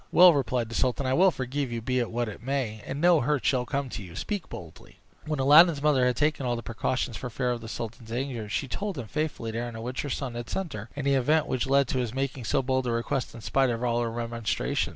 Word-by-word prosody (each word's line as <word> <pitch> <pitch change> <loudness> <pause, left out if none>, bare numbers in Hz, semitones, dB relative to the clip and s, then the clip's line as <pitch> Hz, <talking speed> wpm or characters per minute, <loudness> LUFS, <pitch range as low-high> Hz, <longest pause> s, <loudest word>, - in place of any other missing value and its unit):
"Well,". 180 -1 +8
replied 125 -4 0
the - - -7
sultan, 130 +3 0
"I 130 - +1
will 190 +6 +6
forgive 135 -3 -3
you, 120 - -2
be 125 +3 0
it 120 - -1
what 120 +1 -1
it 105 - -8
may, 120 -4 -2
and 135 - -4
no 170 0 +5
hurt 135 -2 0
shall 125 -2 +2
come 140 -1 -1
to 115 - -6
you. 90 -3 -10
Speak 205 - -4
boldly." 85 -4 -11 0.3
When 155 -1 -1
Aladdin's 145 +3 +6
mother 135 -4 +4
had 125 - +1
taken 150 +2 +1
all 120 -1 0
these 115 - -6
precautions 120 +1 -2
for 125 - -5
fear 125 +1 -1
of 120 -1 -3
the 115 - -8
sultan's 115 0 -6
anger, 120 -3 -3
she 135 - -1
told 200 - -4
him 125 - -4
faithfully 150 -3 -3
the 115 - -3
errand 120 -1 -5
on 115 - -6
which 125 +1 -3
her 145 - -4
son 130 -2 -3
had 120 0 -6
sent 190 -5 -3
her, 105 +2 -7
and 140 -1 -4
the 140 - +3
event 145 +4 +3
which 130 0 -1
led 140 -1 +4
to 130 - 0
his 120 -1 -2
making 135 -2 -2
so 130 - +1
bold 130 0 0
a - - +1
request 115 +2 -2
in 115 - -9
spite 135 +3 +2
of 115 0 -2
all 120 -1 +1
her 115 - -1
remonstrances. 115 -1 -1
125 Hz, 270 wpm, -27 LUFS, 115-140 Hz, 0.3 s, Well